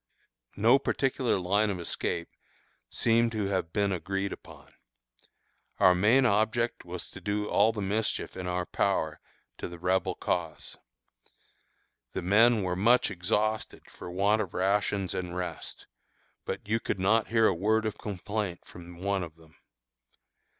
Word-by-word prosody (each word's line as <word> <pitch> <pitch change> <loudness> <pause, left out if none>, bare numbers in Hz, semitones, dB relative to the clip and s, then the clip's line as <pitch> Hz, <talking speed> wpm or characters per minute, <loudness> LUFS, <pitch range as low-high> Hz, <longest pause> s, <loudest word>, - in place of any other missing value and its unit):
No 115 +6 +5
particular 130 -5 0
line 100 +4 +2
of 95 -3 -3
escape 85 0 -3 0.6
seemed 115 0 +2
to 105 -2 -1
have 95 -4 -1
been 100 +1 +1
agreed 95 +2 -2
upon. - - -14 1.1
Our 95 -2 +7
main 110 +9 +4
object 115 +2 +1
was - - -6
to - - -10
do 105 0 -1
all 110 - +4
the 105 -3 -4
mischief 105 +3 -2
in 90 -1 -5
our 90 0 -1
power 80 -7 0 0.4
to - - -4
the 85 - -9
Rebel 95 +1 0
cause. 80 -4 -3 1.4
The - - -3
men 110 +3 +4
were 90 -1 -1
much 115 +5 +3
exhausted 105 +4 -1
for - - -9
want 100 +4 +2
of 95 -4 -5
rations 100 0 0
and 90 -1 -4
rest, 90 0 -5 0.6
but - - -5
you 115 +2 +1
could 100 - -3
not 110 +4 +3
hear 115 -1 +3
a - - +4
word 110 +5 +1
of 110 - -3
complaint 100 -2 -4
from 90 0 -12
one 100 -1 0
of 80 -3 -7
them. 80 -1 -21
100 Hz, 150 wpm, -29 LUFS, 90-110 Hz, 1.4 s, Our